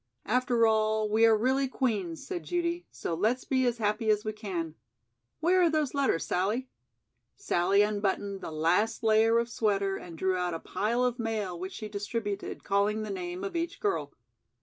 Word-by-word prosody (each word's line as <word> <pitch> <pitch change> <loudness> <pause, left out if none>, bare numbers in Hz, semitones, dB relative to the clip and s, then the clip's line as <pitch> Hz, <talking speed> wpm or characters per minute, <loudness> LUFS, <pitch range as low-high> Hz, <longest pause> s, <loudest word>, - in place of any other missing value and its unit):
"After 245 0 +2
all, 220 -1 +2
we 220 +2 +5
are 220 -1 +5
really 265 +4 +1
'Queen's'" 210 - -2
said 360 -2 -4
Judy, 345 0 -2
"so - - -4
let's 220 +9 +1
be 260 -2 +2
as 240 -1 0
happy 215 0 0
as 210 0 +2
we 215 - -2
can. 185 -7 -4 0.7
Where 365 +3 +4
are 345 - +5
those 310 -4 0
letters, 275 - +1
Sallie?" 215 +8 -1 0.7
Sallie 195 +4 +2
unbuttoned 205 -1 -1
the - - -5
last 175 +10 +1
layer 225 +1 +4
of 235 0 +1
sweater 200 -4 0
and 170 -2 -10
drew 190 +2 +1
out 180 -2 -1
a - - -4
pile 235 +8 -1
of 250 0 0
mail 215 -6 -2
which 185 +2 -5
she 215 - -6
distributed, 205 0 -4
calling 205 +2 +1
the 215 - -4
name 180 -1 -5
of 390 - -4
each 335 0 -2
girl. 270 - -1
215 Hz, 180 wpm, -29 LUFS, 195-245 Hz, 0.7 s, we